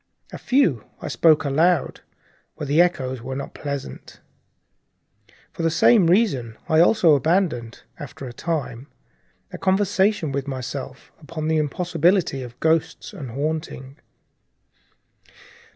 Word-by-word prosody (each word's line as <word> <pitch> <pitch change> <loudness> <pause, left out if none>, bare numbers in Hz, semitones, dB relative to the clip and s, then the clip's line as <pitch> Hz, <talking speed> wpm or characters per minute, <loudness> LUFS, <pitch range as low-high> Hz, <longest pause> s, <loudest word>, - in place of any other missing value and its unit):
A - - -8
few 180 - +1
I - - -6
spoke 160 -2 +3
aloud, 160 +3 +1 0.6
but 150 -2 -5
the 150 +4 +4
echoes 130 -8 -1
were 130 +2 -6
not 140 - -6
pleasant. 140 -2 -7 1.3
For - - -7
the 165 - +2
same 180 +3 +4
reason 150 - +1
I 160 - +3
also 175 -2 +5
abandoned, 145 -5 0 0.2
after 140 -1 -9
a 125 - -8
time, 140 -4 -4 0.7
a - - -7
conversation 190 -3 +1
with 140 0 -3
myself 130 0 -6
upon 155 0 -5
the 160 - +2
impossibility 170 0 0
of 125 -1 -10
ghosts 160 0 0
and 135 -4 -8
haunting. 140 0 -4
155 Hz, 120 wpm, -22 LUFS, 135-175 Hz, 1.3 s, also